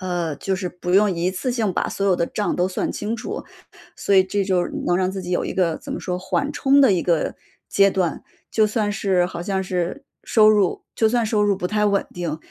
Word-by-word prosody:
呃， 175 Hz, -4 st, -2 dB
就 190 Hz, +5 st, -2 dB
是 185 Hz, -2 st, -4 dB
不 180 Hz, 0 st, -4 dB
用 205 Hz, 0 st, +5 dB
一 175 Hz, +2 st, 0 dB
次 220 Hz, +7 st, -2 dB
性 225 Hz, -4 st, 0 dB
把 -, -, -1 dB
所 200 Hz, -, -2 dB
有 185 Hz, -, +3 dB
的 170 Hz, -, +1 dB
账 205 Hz, +3 st, -2 dB
都 180 Hz, -, +2 dB
算 185 Hz, -, -2 dB
清 210 Hz, +2 st, -3 dB
楚。 235 Hz, +1 st, -5 dB, 0.5 s
所 200 Hz, -, 0 dB
以 190 Hz, -1 st, +6 dB
这 200 Hz, +2 st, -1 dB
就 185 Hz, -2 st, +1 dB
是 -, -, -7 dB
能 175 Hz, -, +2 dB
让 185 Hz, 0 st, +1 dB
自 190 Hz, 0 st, -5 dB
己 180 Hz, -1 st, -7 dB
有 175 Hz, -, 0 dB
一 -, -, -3 dB
个 170 Hz, -4 st, +1 dB
怎 -, -, -8 dB
么 -, -, -4 dB
说， 180 Hz, -1 st, -3 dB
缓 190 Hz, +10 st, -1 dB
冲 275 Hz, +1 st, +4 dB
的 265 Hz, -5 st, +6 dB
一 175 Hz, -, 0 dB
个 170 Hz, -3 st, 0 dB, 0.3 s
阶 195 Hz, 0 st, +4 dB
段。 185 Hz, -5 st, -1 dB, 0.3 s
就 215 Hz, -1 st, +3 dB
算 210 Hz, -1 st, -1 dB
是 195 Hz, -4 st, +1 dB
好 175 Hz, -1 st, -7 dB
像 190 Hz, 0 st, -1 dB
是 185 Hz, +9 st, -3 dB, 0.2 s
收 215 Hz, -2 st, +5 dB
入 205 Hz, -4 st, +2 dB
就 220 Hz, -, +3 dB
算 235 Hz, +1 st, +1 dB
收 215 Hz, -1 st, +1 dB
入 200 Hz, -2 st, +2 dB
不 180 Hz, -2 st, -3 dB
太 210 Hz, +1 st, +1 dB
稳 200 Hz, -1 st, +1 dB
定， 170 Hz, -3 st, -3 dB
190 Hz, 265 characters per minute, -22 LUFS, 180-210 Hz, 0.5 s, 以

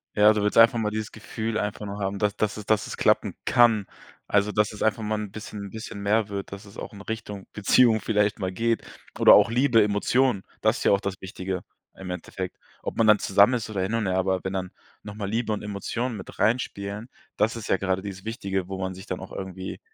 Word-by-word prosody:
Ja, 105 Hz, +1 st, +6 dB
du 105 Hz, -, 0 dB
willst 105 Hz, +2 st, 0 dB
einfach 115 Hz, +1 st, +7 dB
mal 105 Hz, -1 st, 0 dB
dieses 110 Hz, 0 st, -4 dB
Gefühl 110 Hz, 0 st, -4 dB
einfach 105 Hz, 0 st, -3 dB
nur 100 Hz, +1 st, -6 dB
haben, 100 Hz, 0 st, -2 dB
da 105 Hz, -, +3 dB
dass 110 Hz, 0 st, 0 dB
es 105 Hz, -, -7 dB
dass 110 Hz, -1 st, +1 dB
es -, -, -6 dB
klappen -, -, +2 dB
kann. 115 Hz, -4 st, +4 dB, 0.4 s
Also, 105 Hz, +1 st, +2 dB
dass 105 Hz, 0 st, +1 dB
es 105 Hz, -, -4 dB
einfach 110 Hz, 0 st, +1 dB
mal 110 Hz, +1 st, -1 dB
'n 105 Hz, -2 st, -5 dB
bisschen 105 Hz, -1 st, -7 dB
bisschen 110 Hz, -1 st, -7 dB
mehr 105 Hz, +1 st, +1 dB
wird, 100 Hz, -1 st, -5 dB
dass 100 Hz, +2 st, -8 dB
es 100 Hz, -, -14 dB
auch -, -, -7 dB
in 100 Hz, -, -10 dB
Richtung 105 Hz, -2 st, -6 dB
Beziehung 110 Hz, +2 st, +4 dB
vielleicht 105 Hz, -1 st, +1 dB
mal 95 Hz, -2 st, -2 dB
geht. 115 Hz, +4 st, 0 dB, 0.3 s
Oder -, -, +9 dB
auch -, -, +6 dB
Liebe, 120 Hz, -1 st, +4 dB
Emotionen. 105 Hz, +2 st, +2 dB, 0.2 s
Das -, -, +3 dB
ist -, -, -4 dB
ja -, -, +4 dB
auch 100 Hz, -, +4 dB
das 100 Hz, -1 st, -3 dB
Wichtige 95 Hz, 0 st, -4 dB, 0.3 s
im 95 Hz, -1 st, -8 dB
Endeffekt. 90 Hz, 0 st, -5 dB, 0.3 s
Ob -, -, -4 dB
man 115 Hz, -, +4 dB
dann 105 Hz, -1 st, +6 dB
zusammen 100 Hz, +5 st, +4 dB
ist 115 Hz, -2 st, -3 dB
oder 100 Hz, -3 st, -2 dB
hin 95 Hz, +4 st, -1 dB
und 115 Hz, -3 st, 0 dB
her, 95 Hz, -, 0 dB
aber 95 Hz, 0 st, +1 dB
wenn 95 Hz, -, -3 dB
dann 95 Hz, -1 st, -3 dB, 0.3 s
noch 105 Hz, -1 st, -8 dB
mal 100 Hz, -2 st, -4 dB
Liebe 115 Hz, +1 st, -1 dB
und 105 Hz, -, -3 dB
Emotionen 110 Hz, +4 st, -3 dB
mit 95 Hz, -, -10 dB
reinspielen, 105 Hz, -1 st, -1 dB, 0.3 s
das 110 Hz, +2 st, +2 dB
ist 115 Hz, -2 st, -6 dB
ja -, -, +3 dB
grade 95 Hz, 0 st, -1 dB
dieses 95 Hz, -1 st, -7 dB
Wichtige, 95 Hz, -5 st, -3 dB
wo 95 Hz, 0 st, -5 dB
man 95 Hz, 0 st, -2 dB
sich 95 Hz, +1 st, -10 dB
dann -, -, -4 dB
auch -, -, -9 dB
irgendwie 95 Hz, 0 st, -6 dB
105 Hz, 240 wpm, -25 LUFS, 95-110 Hz, 0.4 s, Oder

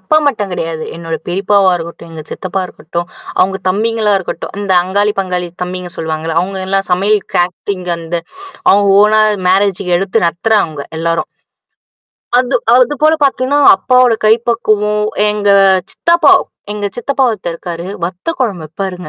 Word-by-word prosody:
அப்பா 190 Hz, +11 st, +1 dB
மட்டும் 210 Hz, -7 st, -3 dB
கிடையாது. 165 Hz, -2 st, -4 dB
என்னோட 165 Hz, -1 st, -4 dB
பெரியப்பாவா 195 Hz, +1 st, +2 dB
இருக்கட்டும், 170 Hz, 0 st, -9 dB
எங்க 155 Hz, -1 st, -7 dB
சித்தப்பா 190 Hz, 0 st, -4 dB
இருக்கட்டும், 170 Hz, 0 st, -6 dB, 0.3 s
அவவுங்க 190 Hz, +1 st, +2 dB
தம்பிங்களா 215 Hz, +2 st, +1 dB
இருக்கட்டும். 190 Hz, -, -6 dB
இந்த 195 Hz, -2 st, -1 dB
அங்காளி, 205 Hz, +3 st, 0 dB
பங்காளி 180 Hz, -2 st, -3 dB, 0.2 s
தம்பிங்க 180 Hz, 0 st, -5 dB
சொல்லுவாங்கள்ல. 160 Hz, 0 st, -3 dB
அவங்க 190 Hz, +1 st, -4 dB
எல்லாம் 195 Hz, +1 st, -1 dB
சமையல் 200 Hz, +3 st, +2 dB
கேட்டரிங் 180 Hz, +1 st, -2 dB
அந்த 165 Hz, +1 st, -4 dB, 0.5 s
அவங்க 200 Hz, 0 st, +4 dB
ஓனா 215 Hz, +1 st, +4 dB, 0.3 s
மேரேஜ்க்கு 190 Hz, -1 st, +2 dB
எடுத்து 185 Hz, -2 st, 0 dB
நடத்துறவங்க 170 Hz, -5 st, 0 dB
எல்லாரும். 165 Hz, 0 st, -1 dB, 1.1 s
அது 255 Hz, +1 st, 0 dB, 0.2 s
அதுபோல 295 Hz, +5 st, +3 dB
பார்த்தீங்கன்னா, 275 Hz, +2 st, +1 dB, 0.2 s
அப்பாவோட 250 Hz, -1 st, +3 dB
கைப்பக்குவம், 215 Hz, -2 st, +1 dB, 0.3 s
எங்க 210 Hz, -1 st, -1 dB, 0.4 s
சித்தப்பா 340 Hz, +1 st, +3 dB, 0.4 s
எங்க 205 Hz, -1 st, -3 dB
சித்தப்பாவ 260 Hz, +1 st, 0 dB
ஒருத்தரு 185 Hz, -5 st, -5 dB
இருக்காரு, 170 Hz, 0 st, -6 dB, 0.2 s
வத்த 180 Hz, -, -6 dB
குழம்பு 200 Hz, -10 st, -2 dB
வப்பாருங்க. 180 Hz, +1 st, -6 dB
195 Hz, 130 wpm, -14 LUFS, 175-215 Hz, 1.1 s, அவங்க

